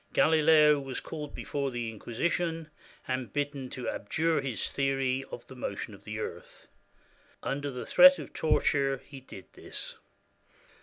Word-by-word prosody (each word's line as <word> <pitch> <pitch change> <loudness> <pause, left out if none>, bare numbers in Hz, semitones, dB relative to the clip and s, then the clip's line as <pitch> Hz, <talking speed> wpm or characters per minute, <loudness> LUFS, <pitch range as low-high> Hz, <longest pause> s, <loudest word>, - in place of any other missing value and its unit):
Galileo 155 -2 +5
was 135 -2 -5
called 150 -3 -7
before 140 -1 -2
the 120 -2 -3
Inquisition, 160 - -2 0.4
and 130 -1 -2
bidden 145 -2 -2
to 125 - -6
abjure 160 +8 0
his 130 -6 -2
theory 135 -1 0
of 120 - -8
the - - -12
motion 105 -3 -5
of 100 - -15
the 110 0 -5
earth. 110 - -7 0.8
Un 140 +1 -2
der 145 - -3
the 125 -2 -6
threat 275 +1 +8
of - - -9
torture 140 -3 +2
he 140 -2 -10
did 115 -7 -12
this. - - -7
135 Hz, 150 wpm, -30 LUFS, 130-150 Hz, 0.8 s, threat